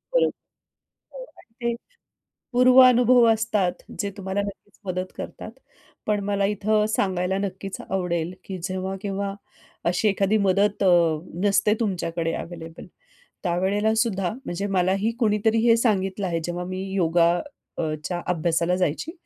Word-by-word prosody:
बरोबर. - - +4
ते 240 - -10
टे - - -3 0.8
पूर्वानुभव 250 -1 +6
असतात, 215 -5 0 0.3
जे 200 -1 -1
तुम्हाला 195 0 -2
नक्कीच 200 0 -9
मदत 185 0 -3
करतात, - - -7 0.6
पण 210 -1 +1
मला 200 -1 0
इथं 210 +1 +1
सांगायला 190 -3 0
नक्कीच 195 0 -5
आवडेल, 180 -2 -1
की 190 -2 -6
जेव्हा 190 +1 -3
केव्हा, 200 -1 -3 0.5
अशी 180 +5 +2
एखादी 200 +2 +2
मदत 200 +1 +2
अ, - - +5 0.6
नसते 205 +1 +3
तुमच्याकडे 170 -5 -1
अव्हेलेबल, 165 -1 -8 0.6
त्यावेळेला 195 +5 +1
सुद्धा, 195 -6 0
म्हणजे 185 +4 -3
मलाही 190 +4 +2
कुणीतरी 220 -1 +2
हे 230 -1 +6
सांगितलं 195 -4 0
आहे, 170 -2 -1
जेव्हा 175 0 -3
मी 185 +1 -4
योगा 170 -2 +3 0.5
अ, - - 0 0.2
च्या 175 -1 -2
अभ्यासाला 170 +1 +1
जायची. 180 - -1
195 Hz, 130 wpm, -24 LUFS, 180-215 Hz, 0.8 s, पूर्वानुभव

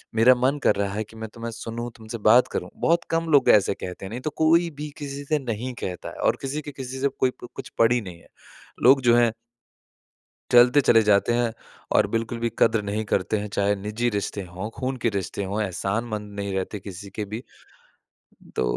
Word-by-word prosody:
मेरा 120 +3 +7
मन 130 +4 +1
कर 105 - +4
रहा 100 -1 -1
है 110 +1 -2
कि 110 - -17
मैं 110 -1 -6
तुम्हें 115 0 -6
सुनूँ, 115 +1 -5
तुमसे 110 +1 -7
बात 115 +4 +5
करूँ। - - -3
बहुत 170 +1 +2
कम 165 0 0
लोग 145 - +5
ऐसे 100 -1 +5
कहते 90 +1 -7
हैं, - - -6
नहीं 120 +3 -6
तो 155 - -2
कोई 165 +2 +4
भी 150 0 -5
किसी 140 -1 -6
से 155 0 +1
नहीं 125 0 -4
कहता 90 -2 -4
है - - -11
और - - +2
किसी 140 +3 -3
के 145 - -8
किसी 130 -1 -7
से 140 - +3
कोई 130 - +3
प - - -6
कुछ - - -7
पड़ी 120 +1 +4
नहीं 90 -4 -9
है। - - -21 0.6
लोग 135 +2 +7
जो 120 -1 +5
हैं 120 -1 +4 1.2
चलते 125 +3 +7
चले 115 -3 +5
जाते 105 +3 +3
हैं। 120 -1 +1 0.4
और - - +4
बिल्कुल 115 +1 -2
भी 115 0 0
कदर 115 -2 +4
नहीं 105 +2 -2
करते 100 +2 0
हैं, 105 - -4
चाहे 100 +1 +1
निजी 105 +4 -2
रिश्ते 100 -1 -3
हों, 90 +5 -6
खून 130 0 -1
के 115 - +2
रिश्ते 100 0 -3
हों 100 +3 -2
एहसानमंद 105 +2 -3
नहीं 100 -1 -3
रहते 95 +2 -3
किसी 100 +1 -9
के 105 - -2
भी। 115 - -4 1.1
तो 65 - +1
115 Hz, 215 wpm, -24 LUFS, 100-130 Hz, 1.2 s, मेरा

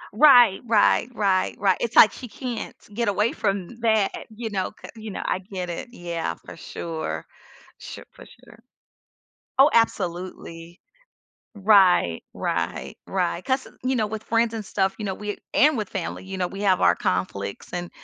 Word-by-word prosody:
Right, 245 -7 +7
right, 225 +2 +3
right, 195 -3 +1
right, 190 -2 +3
it's 235 0 -2
like 220 - +9
she 250 - -9
can't 245 0 -6 0.2
get 235 0 -1
away 210 +3 +2
from 200 +2 -3
that, 220 -3 +1
you 220 0 -6
know, 190 -2 -1
'ca - - -13
you 220 -1 -8
know, - - -5
I 185 - 0
get 185 -2 -6
it, 205 - -6
yeah, 170 - -4
for - - -10
sure. 165 -2 -5 0.5
Sh - - -9
for - - -14
sure. - - -18 1.0
Oh, 280 - +8
absolutely. 175 -5 -2 0.8
Right, 190 - +4
right, - - -3
right. 180 -2 -1
'Cause, 260 0 -1
you 260 +1 0
know, 215 -2 +1
with 220 0 -5
friends 230 0 +1
and 220 - -4
stuff, 195 0 0
you 215 - -5
know, 195 - -2
we 210 +1 -5 0.2
and 300 -1 +4
with 210 -3 -3
family, 185 -1 -4
you 190 0 -6
know, 180 - +1
we 195 +1 -7
have 190 -3 +3
our - - +5
conflicts 100 +2 -3
and 175 0 -4
200 Hz, 170 wpm, -24 LUFS, 180-225 Hz, 1.0 s, like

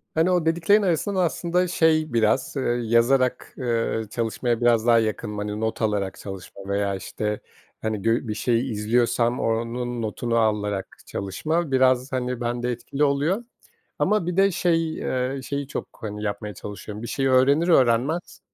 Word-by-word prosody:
Hani, 165 +3 +3
o 175 -3 +2
dediklerin 170 +6 +3
arasından 190 +2 0
aslında 175 +2 0
şey 155 -5 +2
biraz, 115 +5 +1
eee, - - 0 0.2
yazarak, 125 +3 +2
eee, 115 -3 0
çalışmaya 115 +1 -1
biraz 120 -1 +3
daha 115 -1 +6
yakınım. 105 -1 -2
Hani, 105 +1 -3
not 110 +1 -2
alarak 105 -3 -1
çalışma 95 0 -9
veya, 100 0 0
işte, 105 +2 -3 0.4
hani, 110 -2 -2
gö 115 +2 +1
bir 105 - -1
şeyi 120 +3 0
izliyorsam 115 +3 +1
onun 120 +1 -2
notunu 115 +2 -1
alarak 105 -3 -1
çalışma 155 - -2
biraz, 130 0 +3
hani, 125 -1 -2
bende 120 +1 -1
etkili 135 +4 -2
oluyor. 150 +10 +1 0.6
Ama 210 -5 +2
bir 180 +1 -2
de 195 0 +5
şey, 165 -2 +1
eee, 130 +1 -2
şeyi 140 0 -3
çok, - - -5
hani, 105 -1 -5
yapmaya 105 0 -3
çalışıyorum: 105 +2 -8
Bir - - -4
şeyi 135 -1 0
öğrenir 140 +6 +4
öğrenmez, 135 +3 +2
120 Hz, 155 wpm, -24 LUFS, 110-145 Hz, 0.6 s, daha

